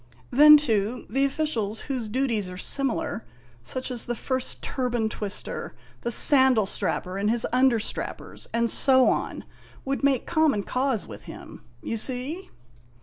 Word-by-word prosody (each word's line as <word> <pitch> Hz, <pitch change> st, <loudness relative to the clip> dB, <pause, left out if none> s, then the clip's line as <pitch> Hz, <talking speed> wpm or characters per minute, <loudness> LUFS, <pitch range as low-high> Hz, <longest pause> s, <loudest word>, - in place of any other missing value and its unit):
Then, 300 Hz, +3 st, +8 dB
too, 230 Hz, -4 st, -2 dB
the 270 Hz, +1 st, +1 dB
officials 245 Hz, -8 st, -3 dB
whose 255 Hz, -5 st, -4 dB
duties 225 Hz, -4 st, -2 dB
are 180 Hz, -, -9 dB
similar 255 Hz, 0 st, -2 dB, 0.4 s
such 255 Hz, -, -4 dB
as 245 Hz, -2 st, -4 dB
the 240 Hz, -, -2 dB
First 260 Hz, +2 st, -3 dB
Turban 245 Hz, -4 st, -2 dB
Twister, 205 Hz, -2 st, -6 dB, 0.3 s
the 235 Hz, -, -3 dB
Sandal 260 Hz, -3 st, +6 dB
Strapper 190 Hz, 0 st, -2 dB
and 205 Hz, +1 st, 0 dB
his 235 Hz, 0 st, 0 dB
understrappers, 250 Hz, -3 st, -1 dB
and 235 Hz, 0 st, 0 dB
so 260 Hz, +2 st, +6 dB
on -, -, -3 dB, 0.4 s
would 275 Hz, +1 st, -3 dB
make 275 Hz, -3 st, +1 dB
common 315 Hz, -11 st, +1 dB
cause 255 Hz, -3 st, -2 dB
with -, -, -11 dB
him. -, -, -11 dB, 0.2 s
You 230 Hz, -, -3 dB
see 260 Hz, -, -4 dB
250 Hz, 145 wpm, -24 LUFS, 220-270 Hz, 0.4 s, Then